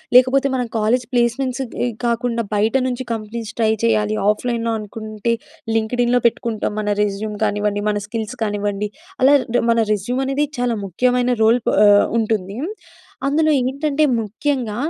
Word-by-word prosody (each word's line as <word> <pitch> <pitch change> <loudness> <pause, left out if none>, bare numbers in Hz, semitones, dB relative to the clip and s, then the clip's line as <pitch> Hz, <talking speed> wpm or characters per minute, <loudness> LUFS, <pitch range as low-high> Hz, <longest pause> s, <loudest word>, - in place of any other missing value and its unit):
లేకపోతే 255 +2 +5
మనం 250 -2 -1
college 230 +3 +1
placements 245 +2 0 0.2
ఇ - - +1 0.2
గాకుండా 235 0 0
బయట 215 +4 +1
నుంచి 255 0 -3
కంపెనీస్ 220 0 -5
ట్రై 220 -1 +3
చేయాలి. 215 -1 +1
ఆఫ్లైన్‌లో 230 +1 0
అనుకుంటే 215 +1 -3 0.4
లింక్‌డ్ 225 +3 0
ఇన్‌లో 245 +1 +2
పెట్టుకుంటాం. 230 -2 -2
మన 210 - -3 0.2
రెజ్యూమ్ 210 +1 -3
కానివ్వండి. 205 0 -1
మన 210 - 0
స్కిల్స్ 220 +2 -4
కానివ్వండి. 205 -1 -2 0.3
అలా 270 +2 +6 0.4
మన 230 - +2
రెజ్యూమ్ 240 +6 -2
అనేది 275 +2 +1
చాలా 245 -1 +1
ముఖ్యమైన 245 +6 +1
రోల్ 230 +3 +5
ప్ - - +5 0.2
ఆహ్, 205 0 +6
ఉంటుంది. 210 -2 -1 0.7
అందులో 310 +3 +2
ఏంటంటే 280 +4 0 0.2
ముఖ్యంగా 230 +1 -2
230 Hz, 140 wpm, -20 LUFS, 210-250 Hz, 0.7 s, అలా